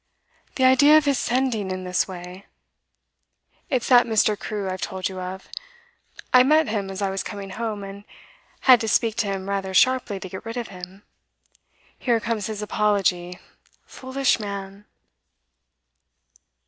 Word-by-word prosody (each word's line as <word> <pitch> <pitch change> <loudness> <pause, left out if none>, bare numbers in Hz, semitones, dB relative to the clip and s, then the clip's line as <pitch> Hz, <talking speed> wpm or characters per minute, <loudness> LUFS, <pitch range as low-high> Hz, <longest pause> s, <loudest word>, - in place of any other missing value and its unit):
'The 260 - 0
idea 285 +4 +7
of 310 - +2
his 280 -3 +1
sending 240 -5 0
in 185 0 -4
this 180 0 0
way! 180 +1 -10 1.2
It's 255 -4 0
that 245 -2 +6
Mr. 215 -1 +2
Crewe 205 -1 -5
I've 185 0 -4
told 190 -1 -3
you 190 -1 -7
of. 185 +1 -7 0.9
I 250 - +8
met 310 +4 +4
him 205 -3 -2
as 195 +1 -4
I 195 - 0
was 195 - -2
coming 200 -2 -7
home, 215 0 -4
and 195 +1 -9 0.6
had 255 -3 +6
to 225 - -2
speak 220 0 +1
to 230 -3 0
him 195 -1 -4
rather 195 -1 -3
sharply 245 -2 +3
to 190 - -7
get 190 +3 -8
rid 225 +2 -6
of 240 - -4
him. 185 +1 -11 1.0
Here 235 -3 +1
comes 225 -2 -2
his 215 -1 -5
apology, 195 -4 0 0.5
foolish 260 -1 -1
man! 200 -1 -7
205 Hz, 155 wpm, -23 LUFS, 190-240 Hz, 1.2 s, I